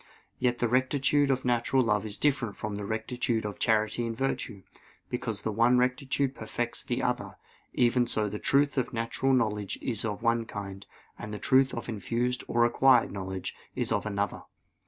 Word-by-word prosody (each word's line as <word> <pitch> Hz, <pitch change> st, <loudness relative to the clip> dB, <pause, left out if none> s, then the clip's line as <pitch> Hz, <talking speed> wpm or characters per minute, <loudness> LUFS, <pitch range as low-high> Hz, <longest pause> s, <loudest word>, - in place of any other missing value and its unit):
Yet 120 Hz, -1 st, +1 dB
the 120 Hz, -, +1 dB
rectitude 135 Hz, +3 st, +2 dB
of 130 Hz, -1 st, 0 dB
natural 125 Hz, +2 st, +2 dB
love 105 Hz, -2 st, +1 dB
is 105 Hz, -, -3 dB
different 135 Hz, -8 st, 0 dB
from 105 Hz, -1 st, -4 dB
the 100 Hz, 0 st, -4 dB
rectitude 110 Hz, +1 st, -1 dB
of 105 Hz, -, -5 dB
charity 110 Hz, +1 st, +2 dB
and 115 Hz, -1 st, -4 dB
virtue: 125 Hz, -7 st, -2 dB, 0.5 s
because -, -, -2 dB
the 110 Hz, -, -1 dB
one 120 Hz, +4 st, +4 dB
rectitude 130 Hz, +2 st, +1 dB
perfects 120 Hz, 0 st, -3 dB
the -, -, -2 dB
other; -, -, -2 dB, 0.4 s
even 120 Hz, 0 st, +3 dB
so 110 Hz, -2 st, +1 dB
the 105 Hz, +1 st, -5 dB
truth 140 Hz, 0 st, +2 dB
of 125 Hz, -, -3 dB
natural 115 Hz, +3 st, 0 dB
knowledge 105 Hz, -6 st, 0 dB
is 115 Hz, -5 st, -2 dB
of 110 Hz, 0 st, -3 dB
one 115 Hz, -1 st, +2 dB
kind, 100 Hz, -2 st, -7 dB, 0.3 s
and 105 Hz, -, -6 dB
the 105 Hz, -, -4 dB
truth 130 Hz, +2 st, +3 dB
of 120 Hz, -, -5 dB
infused 120 Hz, +3 st, -1 dB
or 120 Hz, 0 st, +3 dB
acquired 125 Hz, 0 st, +4 dB
knowledge 95 Hz, -2 st, -4 dB, 0.2 s
is -, -, 0 dB
of -, -, 0 dB
another. 100 Hz, -1 st, -2 dB
115 Hz, 180 wpm, -28 LUFS, 105-125 Hz, 0.5 s, one